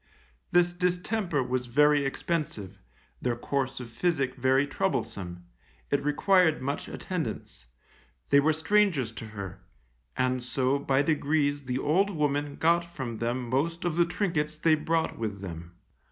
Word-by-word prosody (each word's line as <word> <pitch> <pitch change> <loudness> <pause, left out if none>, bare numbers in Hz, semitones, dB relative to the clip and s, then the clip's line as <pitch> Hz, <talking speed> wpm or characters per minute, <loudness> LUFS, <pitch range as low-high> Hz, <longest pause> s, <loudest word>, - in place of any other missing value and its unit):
This 175 0 +4
distemper 180 -3 0
was 125 0 -2
very 145 +3 +4
expensive, 135 - -3 0.4
their 125 -2 0
course 135 +2 -2
of 120 -2 -8
physic 135 0 0
very 130 +2 +2
troublesome, 90 -9 -3 0.5
it 140 0 +1
required 160 +3 +3
much 140 +2 -3
attendance, 115 - -5 0.6
they 140 - +7
were 150 +3 +4
strangers 160 - +2
to 115 0 -8
her, 100 -4 -7 0.6
and 130 0 +1
so 130 +2 0
by 140 0 +2
degrees 145 -2 +1
the 125 0 -1
old 170 +9 +2
woman 145 -4 -1
got 170 +1 +3
from 130 -9 -6
them 120 +1 -2
most 165 +8 -1
of 170 -3 0
the 170 0 +4
trinkets 165 -5 -1
they 160 +1 +3
brought 160 -1 0
with 105 -3 -3
them. 85 -2 -8
140 Hz, 140 wpm, -28 LUFS, 125-165 Hz, 0.6 s, they